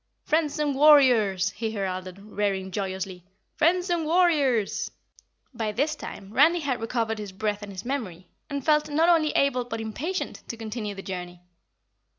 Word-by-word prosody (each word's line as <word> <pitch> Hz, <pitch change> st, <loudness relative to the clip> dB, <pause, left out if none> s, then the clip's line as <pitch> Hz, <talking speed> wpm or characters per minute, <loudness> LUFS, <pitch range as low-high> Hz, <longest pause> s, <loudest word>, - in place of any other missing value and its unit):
"Friends 310 Hz, -1 st, +1 dB
and 300 Hz, -2 st, 0 dB
warriors!" 250 Hz, -10 st, +5 dB
he 225 Hz, +1 st, -3 dB
heralded, 185 Hz, -2 st, -4 dB
rearing 200 Hz, -2 st, -2 dB
joyously. 190 Hz, -2 st, -4 dB, 0.3 s
"Friends 350 Hz, +3 st, +2 dB
and 340 Hz, -2 st, +1 dB
warriors!" 305 Hz, -, +2 dB, 0.6 s
By 225 Hz, -3 st, -2 dB
this 285 Hz, +9 st, 0 dB
time 200 Hz, -7 st, -9 dB
Randy 325 Hz, +7 st, +5 dB
had 260 Hz, -5 st, -2 dB
recovered 225 Hz, -1 st, -1 dB
his 205 Hz, -2 st, -6 dB
breath 210 Hz, +1 st, -2 dB
and 205 Hz, -1 st, -8 dB
his 190 Hz, +1 st, -8 dB
memory 200 Hz, -10 st, -4 dB, 0.2 s
and 280 Hz, -2 st, -4 dB
felt 300 Hz, -1 st, +3 dB
not 320 Hz, +4 st, +3 dB
only 320 Hz, -3 st, +4 dB
able 265 Hz, -3 st, +2 dB
but 230 Hz, -2 st, -5 dB
impatient 270 Hz, -, -4 dB
to 230 Hz, -, -6 dB
continue 215 Hz, -2 st, -5 dB
the 195 Hz, -, -8 dB
journey. 180 Hz, -2 st, -6 dB
225 Hz, 160 wpm, -26 LUFS, 200-300 Hz, 0.6 s, warriors